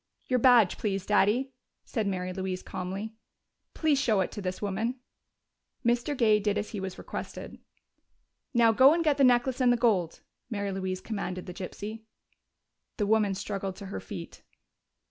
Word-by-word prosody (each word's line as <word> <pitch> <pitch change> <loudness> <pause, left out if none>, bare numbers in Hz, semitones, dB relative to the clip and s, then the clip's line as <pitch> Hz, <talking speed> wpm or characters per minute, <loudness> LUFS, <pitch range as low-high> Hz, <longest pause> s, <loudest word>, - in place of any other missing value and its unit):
"Your 255 -1 +1
badge, 235 -6 +5
please, 195 -3 -2
Daddy," 215 +6 +2 0.3
said 220 -4 -2
Mary 185 -1 -2
Louise 185 -1 -4
calmly. 195 +4 -5 0.6
"Please 305 -4 +2
show 215 -7 +2
it 185 - -2
to 205 - -6
this 185 -1 -3
woman." 215 +5 -2 0.9
Mr. 240 +4 +1
Gay 215 -3 +4
did 205 0 0
as 210 0 -2
he 210 - -4
was 190 -1 -5
requested. - - -7 0.9
"Now 235 -3 +5
go 265 +7 +6
and 335 - 0
get 300 -3 +2
the 280 - +4
necklace 250 +1 +3
and 250 -1 +5
the 245 - +3
gold," 200 -9 +1 0.3
Mary 200 -3 -2
Louise 190 -1 -3
commanded 185 -4 -4
the 180 - -7
gypsy. 205 +4 -6 1.0
The 210 - +1
woman 210 -2 +2
struggled 195 -1 -4
to 200 - -9
her - - -3
feet. 175 -5 -9
210 Hz, 165 wpm, -28 LUFS, 190-240 Hz, 1.0 s, go